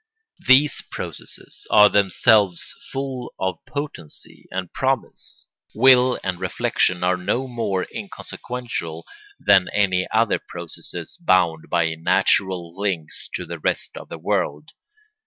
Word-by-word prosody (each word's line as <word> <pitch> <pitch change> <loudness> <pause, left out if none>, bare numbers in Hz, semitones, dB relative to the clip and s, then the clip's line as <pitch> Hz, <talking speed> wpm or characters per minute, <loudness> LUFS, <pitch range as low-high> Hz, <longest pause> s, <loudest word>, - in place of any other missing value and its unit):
These 140 +3 +5
processes - - -8
are 105 -1 +8
themselves 100 -1 +3 0.2
full 135 -2 -5
of 95 0 -1
potency 140 - -7
and 95 -1 -5
promise; 130 0 -2 0.3
will 130 -1 +5
and 95 -2 -2
reflection 90 -1 0
are 90 0 +2
no 120 +8 -1
more 110 -7 -1
inconsequential 115 -10 -6 0.3
than 100 -2 +4
any 95 -3 +2
other 110 0 +2
processes 85 -1 -7
bound 85 -4 +2
by 85 -2 +1
natural 85 +1 +1
links 95 -6 -3
to - - -4
the 85 0 -7
rest - - -1
of - - -9
the - - -6
world. 75 +1 -2
95 Hz, 120 wpm, -22 LUFS, 85-120 Hz, 0.3 s, are